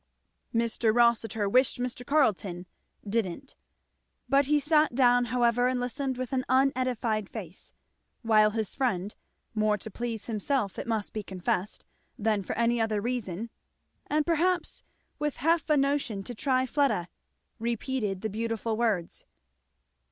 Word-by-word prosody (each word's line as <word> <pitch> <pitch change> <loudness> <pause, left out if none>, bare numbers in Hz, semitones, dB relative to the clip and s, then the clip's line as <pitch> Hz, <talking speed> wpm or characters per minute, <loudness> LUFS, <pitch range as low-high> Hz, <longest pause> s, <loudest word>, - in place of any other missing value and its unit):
Mr. 230 -1 +1
Rossitur 225 -2 +2
wished 255 +6 +3
Mr. 245 0 -3
Carleton 210 - +1 0.4
didn't. 220 +4 -2 0.7
But 275 +2 +3
he 300 0 +4
sat 300 -2 +3
down, 245 -1 +4
however, 240 0 +2
and 255 0 0
listened 260 +1 -2
with 255 0 -4
an 255 -1 +1
unedified 255 -5 +1
face; 190 -5 -9 0.5
while 215 -2 +5
his 220 -1 -2
friend, 205 -6 -1 0.4
more 215 -1 +2
to 215 +2 -7
please 230 0 -4
himself 220 -1 -1
it - - -5
must 220 -3 -2
be 215 - -2
confessed 190 0 -3 0.3
than 210 -1 +1
for - - -4
any 235 0 +2
other 220 -2 0
reason, 225 -2 -3 0.6
and 300 0 +1
perhaps 345 +1 0 0.4
with 295 -1 -1
half 325 +3 +1
a 300 - +4
notion 275 -7 0
to 245 - -7
try 260 +2 +1
Fleda, 260 - +1 0.5
repeated 230 -3 -2
the 220 - -2
beautiful 225 0 -2
words. 215 -7 -1
235 Hz, 135 wpm, -28 LUFS, 215-260 Hz, 0.7 s, while